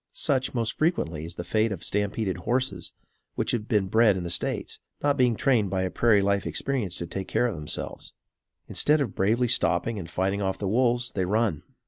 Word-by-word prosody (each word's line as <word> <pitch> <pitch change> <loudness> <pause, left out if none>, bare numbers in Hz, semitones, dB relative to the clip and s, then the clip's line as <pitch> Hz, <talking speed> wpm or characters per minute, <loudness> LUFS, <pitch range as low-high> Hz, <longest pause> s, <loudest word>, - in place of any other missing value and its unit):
Such, 130 -3 0
most 115 -2 -1
frequently, 85 - 0
is 85 +1 -8
the 85 - -5
fate 110 +5 +1
of 95 -5 -5
stampeded 100 -2 -1
horses 120 -1 -2 0.4
which - - 0
have 115 -2 -2
been 105 -3 +2
bred 110 -1 +4
in 90 - -4
the 85 - -4
States, - - -2 0.2
not 145 -1 +3
being 125 -4 +3
trained 115 -6 +2
by 95 0 0
a 95 - -2
prairie 105 -4 +3
life 100 0 +1
experience 120 -11 -2
to 85 - -4
take 95 +2 -5
care - - +1
of 120 - 0
themselves. 75 -2 -6 0.6
Instead 150 +1 +3
of 130 -8 -1
bravely 115 +6 +2
stopping 115 -2 +1
and 85 -4 -7
fighting 95 +3 -1
off 95 -1 -1
the 100 - -3
wolves, 120 +3 +1
they 95 -2 -1
run. 105 -5 0
105 Hz, 200 wpm, -26 LUFS, 95-120 Hz, 0.6 s, bred